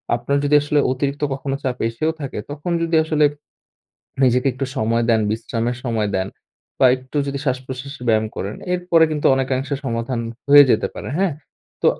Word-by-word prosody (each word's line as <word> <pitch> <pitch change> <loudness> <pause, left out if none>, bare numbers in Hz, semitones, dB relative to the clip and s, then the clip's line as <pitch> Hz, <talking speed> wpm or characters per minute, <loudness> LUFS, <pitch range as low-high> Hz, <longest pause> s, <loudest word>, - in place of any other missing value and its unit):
আপনার 120 +4 -1
যদি 145 +1 +3
আসলে 145 0 +1
অতিরিক্ত 140 +2 -2
কখনো 135 0 -3
চাপ 125 -2 -2
এসেও 155 +8 -1
থাকে, 135 -5 -5
তখন 145 +4 -4
যদি 165 0 0
আসলে 155 -1 +2 1.0
নিজেকে 125 0 +3
একটু 135 +2 -3
সময় 115 -1 +1
দেন, 110 -1 +4
বিশ্রামের 115 +2 -2
সময় 115 -4 0
দেন 95 0 -1 0.5
বা 130 - +7
একটু 130 +3 -10
যদি 140 0 -3
শ্বাস-প্রশ্বাসের 130 +1 -4
ব্যায়াম 110 -1 +3
করেন, 100 +2 -4 0.2
এরপরে 175 -2 +3
কিন্তু 150 -1 0
অনেকাংশে 135 +1 -1
সমাধান 115 0 -2 0.3
হয়ে 145 0 +9
যেতে - - +2
পারে, - - -7
হ্যাঁ? 190 -3 +2 0.5
তো - - +3
130 Hz, 165 wpm, -20 LUFS, 120-145 Hz, 1.0 s, হয়ে